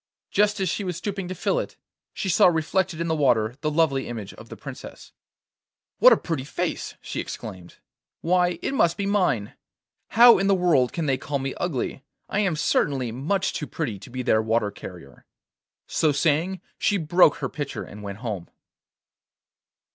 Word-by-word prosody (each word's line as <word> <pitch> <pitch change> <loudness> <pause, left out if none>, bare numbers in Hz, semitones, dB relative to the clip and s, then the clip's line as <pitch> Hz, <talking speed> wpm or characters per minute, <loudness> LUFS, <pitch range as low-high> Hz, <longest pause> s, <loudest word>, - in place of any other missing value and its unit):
Just 210 0 +2
as 190 - 0
she 205 - -2
was 180 -3 -3
stooping 195 0 -4
to 185 - -5
fill - - 0
it, - - -6 0.3
she 195 - -4
saw 180 - +5
reflected 175 +1 0
in 170 - -1
the 160 - +1
water 120 -7 +2
the 155 - 0
lovely 150 -4 +1
image 110 -4 -6
of 110 - -13
the - - -9
Princess. 140 -3 -10 0.9
'What - - +8
a - - +6
pretty 160 -6 -3
face!' 140 - -3
she - - -5
exclaimed, 95 -5 -7 0.5
'Why, 180 0 +2
it - - -1
must 170 -10 +2
be 200 - -2
mine! 180 - +1 0.5
How 235 -1 +7
in 195 - +1
the 200 - +4
world 165 -9 +3
can 165 - -3
they 135 -3 +1
call 140 +2 -2
me 135 0 -3
ugly? 135 -5 -3 0.3
I 205 - 0
am 195 -6 +1
certainly 135 -5 0
much 155 - -1
too 150 - -4
pretty 120 -12 -4
to - - -12
be 130 +1 -4
their 110 -3 +3
water 110 -1 0
carrier!' 85 -11 -12 0.6
So 155 - +1
saying, 160 +6 +1 0.2
she 205 - +2
broke 165 -2 +4
her 140 -2 -3
pitcher 145 +2 -5
and 105 - -11
went 100 -1 -6
home. 100 -6 -4
155 Hz, 180 wpm, -24 LUFS, 125-185 Hz, 0.9 s, What